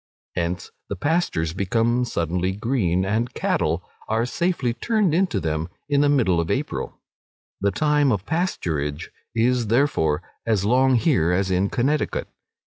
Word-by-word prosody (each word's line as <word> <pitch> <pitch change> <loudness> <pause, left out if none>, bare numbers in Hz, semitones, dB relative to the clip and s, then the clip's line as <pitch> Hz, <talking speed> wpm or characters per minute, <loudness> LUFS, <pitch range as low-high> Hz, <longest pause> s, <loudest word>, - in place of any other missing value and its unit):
Hence 85 +1 -2 0.2
the - - -2
pastures 145 - 0
become 115 +6 +1
suddenly 90 -2 -1
green, 95 -5 0
and 110 +5 0
cattle - - 0 0.2
are 110 +2 +1
safely 140 -3 0
turned 210 - +1
into 185 +1 +2
them 80 +1 -2 0.2
in 145 -1 +2
the 145 - +4
middle 115 -12 +3
of 85 - -1
April; - - -3 0.6
the 100 - +2
time 150 +4 +2
of 100 -3 -1
pasturage 80 - -2 0.3
is, 120 0 +2
therefore, 110 - +2 0.2
as 105 -4 +1
long 130 +3 +4
here 110 - +2
as 95 +1 +1
in 95 +2 +2
Connecticut. 140 +4 0
115 Hz, 140 wpm, -23 LUFS, 90-140 Hz, 0.6 s, the